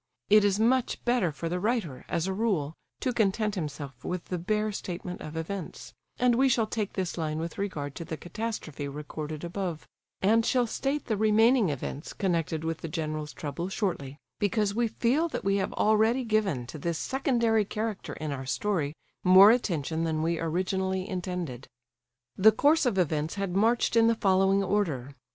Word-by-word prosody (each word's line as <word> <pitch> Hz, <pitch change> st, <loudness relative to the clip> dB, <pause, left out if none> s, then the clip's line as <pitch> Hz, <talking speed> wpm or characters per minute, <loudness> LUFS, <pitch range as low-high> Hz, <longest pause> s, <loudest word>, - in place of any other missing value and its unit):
It 210 Hz, 0 st, +7 dB
is 205 Hz, 0 st, +2 dB
much 245 Hz, +3 st, +1 dB
better 240 Hz, -9 st, +2 dB
for 165 Hz, +3 st, -5 dB
the 180 Hz, +2 st, -1 dB
writer, 205 Hz, -, -1 dB
as 165 Hz, -, 0 dB
a 190 Hz, -, -1 dB
rule, 190 Hz, -9 st, 0 dB, 0.3 s
to 255 Hz, -, 0 dB
content 215 Hz, -1 st, +1 dB
himself 145 Hz, -, -6 dB
with 180 Hz, -1 st, -3 dB
the 180 Hz, -, -3 dB
bare 215 Hz, +4 st, 0 dB
statement 180 Hz, -2 st, -6 dB
of 155 Hz, +1 st, -7 dB
events; 170 Hz, +2 st, -6 dB, 0.2 s
and 250 Hz, -1 st, +3 dB
we 265 Hz, +3 st, +4 dB
shall 235 Hz, -3 st, +3 dB
take 215 Hz, -2 st, -3 dB
this 185 Hz, -2 st, -3 dB
line 155 Hz, -1 st, -2 dB
with 165 Hz, +3 st, -5 dB
regard 150 Hz, -8 st, -3 dB
to -, -, -5 dB
the 160 Hz, -, -5 dB
catastrophe 175 Hz, -7 st, -5 dB
recorded 150 Hz, +2 st, -6 dB
above, 175 Hz, -2 st, -4 dB, 0.3 s
and 225 Hz, +4 st, +4 dB
shall 250 Hz, +1 st, +2 dB
state 275 Hz, +5 st, -2 dB
the 220 Hz, -4 st, -1 dB
remaining 220 Hz, +1 st, +4 dB
events 145 Hz, +1 st, -5 dB
connected 165 Hz, -5 st, -1 dB
with 160 Hz, 0 st, -2 dB
the -, -, -5 dB
general's 155 Hz, -2 st, -3 dB
trouble 170 Hz, +5 st, -5 dB
shortly, 170 Hz, -9 st, -3 dB, 0.2 s
because 205 Hz, 0 st, +1 dB
we 235 Hz, +2 st, +1 dB
feel 255 Hz, +9 st, +1 dB
that -, -, -5 dB
we 195 Hz, 0 st, +2 dB
have 190 Hz, -, -1 dB
already 220 Hz, +4 st, +3 dB
given 210 Hz, -, 0 dB
to 130 Hz, +5 st, -8 dB
this 170 Hz, +2 st, -2 dB
secondary 235 Hz, -, +1 dB
character 215 Hz, 0 st, -4 dB
in 155 Hz, -1 st, -4 dB
our 135 Hz, -2 st, -5 dB
story 160 Hz, -2 st, -1 dB, 0.3 s
more 190 Hz, +3 st, +9 dB
attention 165 Hz, -, 0 dB
than 160 Hz, -1 st, 0 dB
we 165 Hz, 0 st, 0 dB
originally 190 Hz, +3 st, -1 dB
intended. 180 Hz, -8 st, -4 dB, 0.7 s
The 220 Hz, +3 st, +7 dB
course 290 Hz, +6 st, +3 dB
of 215 Hz, -6 st, 0 dB
events 155 Hz, -2 st, 0 dB
had 195 Hz, -3 st, -3 dB
marched 230 Hz, +4 st, +2 dB
in 230 Hz, 0 st, +6 dB
the 230 Hz, -, +3 dB
following 195 Hz, -1 st, +3 dB
order. 160 Hz, -10 st, -1 dB
190 Hz, 180 wpm, -28 LUFS, 160-220 Hz, 0.7 s, more